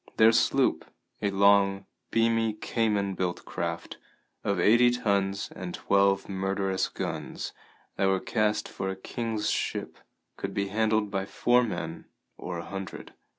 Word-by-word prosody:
Their 110 0 +7
sloop, - - +2 0.4
a 100 - +1
long, 100 0 +4 0.2
beamy 115 -1 +2
Cayman 105 -2 0
built 90 -1 -3
craft, - - -4 0.5
of 100 -2 0
eighty 120 +7 +6
tons 100 -5 0
and - - -5
twelve 100 0 +2
murderous 95 0 -1
guns - - -5 0.4
that 95 - +2
were 95 0 +2
cast 105 0 0
for 95 - -4
a 95 - -3
king's 110 +2 -2
ship, - - -3 0.4
could - - -5
be 100 0 -1
handled 110 0 +1
by 95 -1 -2
four 125 +3 +3
men 85 -8 -4 0.3
or 90 -1 -5
a 85 - -6
hundred. 95 -1 -7
100 Hz, 140 wpm, -28 LUFS, 95-110 Hz, 0.5 s, Their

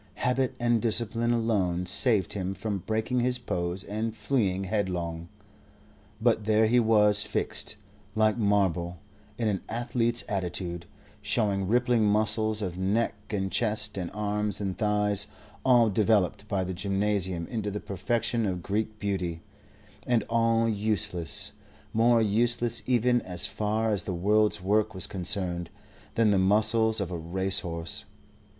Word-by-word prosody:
Habit 125 +1 0
and 120 -2 +2
discipline 115 0 +1
alone 100 -7 0
saved 100 +2 +2
him 95 -1 -3
from 100 +1 -3
breaking 110 +6 -1
his 125 +1 +1
pose 90 -5 -3
and 110 +2 -3
fleeing 100 -8 0
headlong. 90 -5 -2 0.9
But 110 -2 +2
there 110 0 +4
he 120 +3 +4
was 105 -2 +4
fixed, 105 - -1 0.4
like 110 -1 +3
marble, 95 -5 +1 0.4
in 115 - 0
an 100 -3 0
athlete's 120 0 0
attitude, 90 -3 -3 0.3
showing 100 -4 0
rippling 120 +1 +2
muscles 110 +1 +2
of 90 -2 -4
neck 105 +5 +1 0.2
and 95 -3 -2
chest 105 -2 +1
and 90 -3 -3
arms 105 0 -1
and 95 -3 -2
thighs 105 -2 +1 0.4
all 120 -3 +5
developed 105 -1 +1
by 100 -3 -1
the 95 0 -4
gymnasium 95 -2 -1
into 110 0 -3
the 105 +1 -4
perfection 115 +4 -1
of 90 -2 -3
Greek 110 +2 -2
beauty, 90 -5 -3 0.6
and 120 -4 +2
all 115 0 +2
useless, 100 -6 -1 0.4
more 115 +1 +4
useless 115 +2 +1
even, 120 -1 +3
as 90 -2 0
far 110 +1 -1
as 100 -4 -1
the 95 - -3
world's 105 +2 +2
work 105 +2 +1
was 95 - 0
concerned, 90 -2 -1 0.5
than 115 -3 +3
the 100 - +3
muscles 110 +3 +3
of 95 -3 -3
a 90 - -3
racehorse. 85 -1 -2
105 Hz, 140 wpm, -27 LUFS, 95-115 Hz, 0.9 s, all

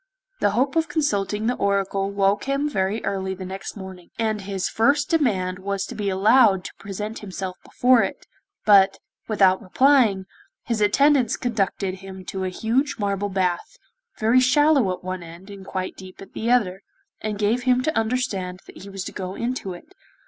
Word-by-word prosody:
The - - +3
hope 270 +4 +1
of 320 -1 +1
consulting 210 - 0
the 245 - +2
Oracle 195 -2 0
woke 200 0 +1
him 275 +2 0
very 200 -5 -1
early 190 -1 -2
the 185 0 -7
next 190 +3 -7
morning, 190 -3 -10
and 220 -2 -1
his 195 -1 -3
first 280 +6 +2
demand 190 - +1
was 195 0 -2
to - - -8
be 205 -2 -2
allowed 195 0 +4
to - - -8
present 210 +2 -5
himself 190 -2 -5
before 250 -1 +3
it, - - -4 0.4
but, 195 -2 +6 0.3
without 195 -3 +3
replying, 220 -2 +3 0.4
his 230 -3 -2
attendants 255 +3 +3
conducted 195 -5 -1
him 190 -1 -10
to 190 +1 -4
a - - -1
huge 240 +10 0
marble 205 -1 -1
bath, 185 -2 -1 0.4
very 225 +3 +4
shallow 275 -4 +4
at 185 - -6
one 185 0 -4
end, 170 +4 -11
and 195 -1 -11
quite 185 -1 -4
deep 185 -1 -12
at 195 - -12
the 230 - -2
other, 200 -7 +2 0.4
and 215 -1 -3
gave 215 +4 +1
him 255 0 +3
to 310 +2 -1
understand 220 -6 -1
that - - -13
he 200 - -10
was 195 -1 -5
to - - -6
go 185 0 -5
into 235 -5 -3
it. 175 - -14
200 Hz, 180 wpm, -23 LUFS, 190-245 Hz, 0.4 s, but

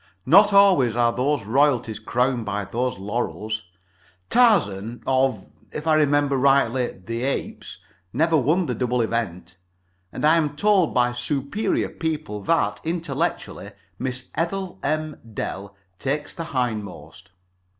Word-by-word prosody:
Not 200 +9 +6
always 190 - +5
are 120 -1 +2
those 140 -1 0
royalties 125 -2 +1
crowned 125 0 0
by 105 -1 -3
those 120 +4 -2
laurels. 110 +1 -3 0.7
Tarzan 120 - +2
(of, 130 -6 0 0.2
if 150 - -6
I 160 - +3
remember 145 -2 +2
rightly, 130 -2 +3
the 115 +5 -6
Apes) 135 +2 -4 0.3
never 160 +6 +2
won 155 +6 +2
the 125 - -2
double 125 -1 0
event. 95 -6 -3 0.5
And - - -3
I 160 +2 +5
am 150 -3 0
told 195 0 +2
by 125 0 +2
superior 140 - -1
people 155 -10 -4
that, 165 - +1
intellectually, 160 - -3 0.3
Miss 125 0 -4
Ethel 185 +3 -3
M. 155 +1 -2 0.2
Dell 100 +1 -5 0.2
takes 145 +2 -2
the 165 - -6
hindmost. 105 - -4
130 Hz, 130 wpm, -23 LUFS, 115-155 Hz, 0.7 s, Not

